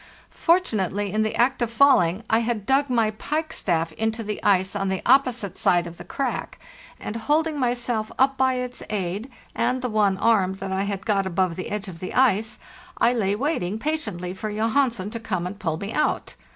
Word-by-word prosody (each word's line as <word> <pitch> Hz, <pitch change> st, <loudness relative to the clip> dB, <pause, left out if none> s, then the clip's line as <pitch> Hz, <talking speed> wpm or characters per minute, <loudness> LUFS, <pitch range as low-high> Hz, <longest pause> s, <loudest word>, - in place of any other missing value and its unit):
Fortunately, 205 Hz, -, +1 dB
in 215 Hz, +2 st, +1 dB
the 215 Hz, 0 st, 0 dB
act 255 Hz, +2 st, +2 dB
of 240 Hz, -, +1 dB
falling, 230 Hz, -8 st, +4 dB
I 225 Hz, -, +3 dB
had 230 Hz, -3 st, -2 dB
dug 275 Hz, +3 st, +2 dB
my 230 Hz, -3 st, +2 dB
pikestaff 215 Hz, -, -1 dB
into 220 Hz, +6 st, -2 dB
the 210 Hz, 0 st, -4 dB
ice 190 Hz, -1 st, +2 dB
on 195 Hz, -1 st, -1 dB
the 190 Hz, -1 st, -2 dB
opposite 250 Hz, -6 st, +2 dB
side 175 Hz, -1 st, +3 dB
of 170 Hz, 0 st, -9 dB
the -, -, -9 dB
crack, 270 Hz, -3 st, -3 dB, 0.4 s
and, 210 Hz, -, -5 dB
holding 300 Hz, +6 st, 0 dB
myself 240 Hz, -3 st, -1 dB
up 270 Hz, +1 st, +3 dB
by 260 Hz, -1 st, +2 dB
its 250 Hz, 0 st, -4 dB
aid 205 Hz, +3 st, -3 dB, 0.2 s
and 250 Hz, +2 st, 0 dB
the 250 Hz, -, -1 dB
one 205 Hz, -3 st, +2 dB
arm 195 Hz, -4 st, +2 dB
that 195 Hz, 0 st, -6 dB
I 190 Hz, +1 st, 0 dB
had 200 Hz, -1 st, -4 dB
got 200 Hz, -3 st, +1 dB
above 185 Hz, -1 st, 0 dB
the 185 Hz, -, -5 dB
edge 210 Hz, -1 st, -4 dB
of 170 Hz, -3 st, -9 dB
the 185 Hz, -, -6 dB
ice, 225 Hz, -4 st, +2 dB, 0.4 s
I 240 Hz, -, +3 dB
lay 205 Hz, -4 st, +1 dB
waiting 215 Hz, -, -1 dB
patiently 220 Hz, -, -3 dB
for 215 Hz, +3 st, -5 dB
Johansen 220 Hz, -1 st, 0 dB
to 230 Hz, -, -5 dB
come 185 Hz, -6 st, -3 dB
and 195 Hz, +3 st, -6 dB
pull 160 Hz, -5 st, -1 dB
me 200 Hz, +5 st, -5 dB
out. 305 Hz, -, 0 dB
215 Hz, 195 wpm, -24 LUFS, 190-250 Hz, 0.4 s, falling